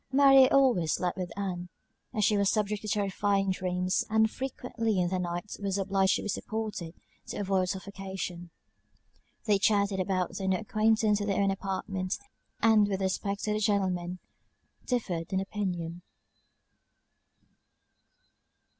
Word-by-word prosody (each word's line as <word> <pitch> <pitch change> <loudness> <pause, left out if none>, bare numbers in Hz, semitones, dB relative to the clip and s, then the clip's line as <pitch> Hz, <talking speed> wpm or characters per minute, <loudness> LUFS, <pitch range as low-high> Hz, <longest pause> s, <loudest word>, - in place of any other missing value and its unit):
Mary 270 -1 +7
always 245 - +3
slept 180 -1 -1
with 180 -2 -4
Ann, 180 -3 -3 0.4
as 210 -2 +1
she 210 - +3
was 200 -1 +3
subject 210 -1 0
to 215 - -7
terrifying 200 -1 +1
dreams; 185 0 0
and 220 0 +3
frequently 245 -5 -2
in 175 -1 +1
the 185 0 -1
night 175 +3 -4
was 200 -1 -1
obliged 195 0 +2
to - - -3
be - - -4
supported, 210 -5 -4 0.3
to - - -5
avoid 190 -2 +1
suffocation. 190 -3 -5 1.0
They 205 -3 +3
chatted 200 -2 +2
about 185 -1 -1
their 190 - -3
new 190 -1 +2
acquaintance 215 -2 +2
in 205 - -2
their 195 - +1
own 195 -1 +3
apartment, 195 -1 -3 0.5
and, 220 -2 +5
with 195 -2 -1
respect 200 +1 -2
to 210 - 0
the 210 - 0
gentlemen, 185 -4 0 0.7
differed 190 -9 -2
in 190 - +2
opinion. 180 -4 -3
195 Hz, 140 wpm, -29 LUFS, 185-210 Hz, 1.0 s, Mary